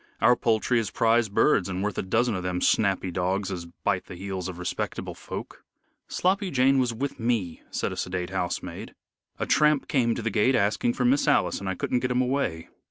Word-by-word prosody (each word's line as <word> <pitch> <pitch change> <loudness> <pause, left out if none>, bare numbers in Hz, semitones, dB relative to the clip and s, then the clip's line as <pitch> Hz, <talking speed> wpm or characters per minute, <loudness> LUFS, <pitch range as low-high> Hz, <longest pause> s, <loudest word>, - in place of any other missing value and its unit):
"Our 125 - +5
poultry 115 +1 +1
is 110 -3 -2
prize 115 -1 +2
birds 100 -1 +3
and 95 +1 -2
worth 105 -2 -1
a - - +1
dozen 115 +5 +1
of 95 - -2
them 90 0 -2
snappy 95 -1 +2
dogs 95 +3 -1
as 85 -2 -5
bite 90 +2 -2
the 90 - -9
heels 95 -1 -4
of 90 - -7
respectable 90 - -4
folk." - - -8 0.4
"Sloppy 190 +2 0
Jane 135 -2 +3
was 125 -2 +1
with 135 +5 -4
me," 110 -8 -1
said - - -2
a - - -5
sedate 90 0 -3
housemaid. 90 -2 -4 0.4
"A - - -2
tramp 150 -1 +3
came 120 -6 +2
to 120 - -5
the 115 - -1
gate 110 +6 +3
asking 105 +3 +1
for 125 - -1
Miss 135 +4 +3
Alice, - - +2
and 100 - -4
I 95 - -2
couldn't 125 - 0
get 125 - -1
him 125 0 +1
away." 125 -11 -2
105 Hz, 210 wpm, -26 LUFS, 95-125 Hz, 0.4 s, Our